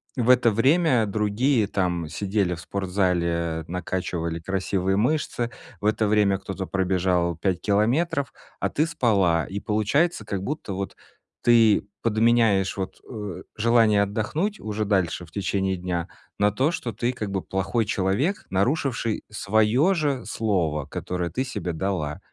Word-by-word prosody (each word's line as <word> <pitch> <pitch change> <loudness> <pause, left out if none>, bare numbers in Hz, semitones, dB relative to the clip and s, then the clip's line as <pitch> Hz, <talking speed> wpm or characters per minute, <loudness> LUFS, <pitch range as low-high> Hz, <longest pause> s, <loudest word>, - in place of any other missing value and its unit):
в 125 -3 0
это 125 -2 +6
время 130 +1 +3
другие 110 +4 +1
там 90 -4 -1
сидели 95 +2 -1
в 85 - -7
спортзале, 85 -3 -1
накачивали 85 -2 -3
красивые 95 +1 -1
мышцы, 120 +1 0 0.3
в - - -5
это 110 0 +2
время 105 -2 +3
кто-то 95 0 -6
пробежал 90 -2 +1
5 90 +2 -1
километров, 130 - +1 0.3
а - - 0
ты 155 - +1
спала, 100 - +2
и 100 - -4
получается 110 +9 +1
как 100 -2 -4
будто 140 -4 -4
вот 95 +1 -4 0.5
ты 115 -4 +4 0.2
подменяешь 110 -4 +3
вот, 95 -1 -4
э, 105 -6 -6 0.2
желание 110 -2 +4
отдохнуть 150 - -2
уже 110 0 -3
дальше 95 -4 0
в 80 - -20
течение 95 0 -1
дня 90 -1 -3 0.3
на 105 0 +3
то, 130 +8 +1
что 120 -8 -4
ты 120 +4 -1
как 110 -5 -5
бы 95 -1 -1
плохой 95 +5 -1
человек, 105 - 0
нарушивший 115 +2 0
свое 110 - +2
же 145 -6 -1
слово, 85 -9 0
которое 90 +2 -4
ты 130 - -1
себе 105 -10 -4
дала. 80 -4 -2
100 Hz, 140 wpm, -24 LUFS, 90-115 Hz, 0.5 s, это